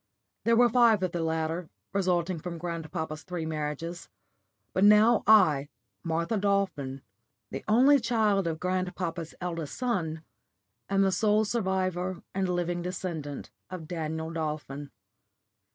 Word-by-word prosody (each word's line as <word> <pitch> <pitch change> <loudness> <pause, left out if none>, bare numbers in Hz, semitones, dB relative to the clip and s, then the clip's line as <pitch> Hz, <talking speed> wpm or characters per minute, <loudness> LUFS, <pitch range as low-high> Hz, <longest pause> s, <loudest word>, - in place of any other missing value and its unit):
There 230 - +4
were 240 +1 +6
five 230 -4 +4
of 185 - 0
the 170 - -2
latter, 160 +1 -2 0.2
resulting 180 -3 +1
from 170 +1 -6
grandpapa's 160 -2 -4
three 175 -2 -5
marriages; 160 +2 -4 0.6
but 185 - +2
now 210 +2 +6
I, 150 -10 +5 0.3
Martha 170 +6 -1
Dolphin, 195 -10 -1 0.5
the - - -5
only 265 +6 +6
child 215 -5 +1
of 160 -1 -2
grandpapa's 180 -2 -3
eldest 165 -5 -4
son, 175 -11 -2 0.7
am 195 0 +3
the 195 - +3
sole 215 +2 +3
survivor 185 -4 -1
and 190 -1 0
living 175 0 -1
descendant 170 -5 -5 0.2
of 180 -4 -7
Daniel 160 -1 -3
Dolphin. 150 -3 -4
175 Hz, 125 wpm, -28 LUFS, 160-200 Hz, 0.7 s, were